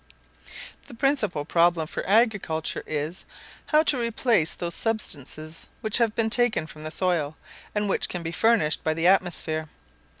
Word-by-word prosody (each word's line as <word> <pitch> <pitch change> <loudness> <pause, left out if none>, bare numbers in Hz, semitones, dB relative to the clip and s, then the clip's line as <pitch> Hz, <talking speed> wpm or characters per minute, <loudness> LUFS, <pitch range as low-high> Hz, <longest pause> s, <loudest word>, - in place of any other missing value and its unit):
The - - -11
principal 230 - 0
problem 170 0 +2
for - - -5
agriculture 200 -8 +1
is, 155 +4 -3 0.4
how 305 0 +4
to 285 -5 +2
replace 230 -7 +1
those 170 -1 -3
substances 160 - -2
which 220 +2 +1
have 230 -2 +2
been 225 -1 +1
taken 240 -8 +2
from 155 -1 -12
the 155 - -4
soil, 160 -4 -1 0.4
and 210 0 0
which 195 - 0
cannot 175 -2 -5
be 165 - -4
furnished 215 -6 +2
by 155 0 0
the 165 +1 -1
atmosphere. 170 -4 +1
180 Hz, 155 wpm, -25 LUFS, 160-225 Hz, 0.4 s, how